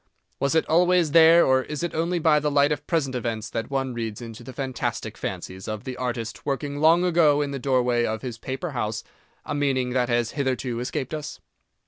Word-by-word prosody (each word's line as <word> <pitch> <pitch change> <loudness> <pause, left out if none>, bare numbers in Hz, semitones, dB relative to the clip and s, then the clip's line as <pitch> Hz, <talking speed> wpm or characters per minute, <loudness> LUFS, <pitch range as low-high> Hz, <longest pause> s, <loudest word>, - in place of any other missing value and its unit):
Was 140 +3 +1
it 160 - +3
always 175 -1 +3
there, 165 +1 +7
or 130 0 +4
is 150 +4 -5
it 175 - -2
only 170 +2 0
by 155 -2 +4
the 150 0 0
light 145 0 +3
of 145 -1 -3
present 150 -6 0
events 115 -3 -3
that 115 +1 -3
one 135 -2 -1
reads 115 -3 -4
into 115 -1 -9
the 130 - -8
fantastic 130 0 -3
fancies 95 0 -6
of 110 0 -4
the 130 -1 -5
artist 120 -3 -4
working 145 +1 -3
long 165 +3 +5
ago 165 -5 +4
in 140 - -4
the 140 - -4
doorway 125 -2 +2
of 110 +1 -2
his 120 -3 -5
paper 135 +8 -4
house, 110 -4 -3 0.4
a - - -3
meaning 135 -3 0
that 125 -1 +1
has 120 -1 +1
hitherto 130 -4 -2
escaped 130 +3 -3
us? 155 -1 -5
135 Hz, 205 wpm, -25 LUFS, 120-150 Hz, 0.4 s, there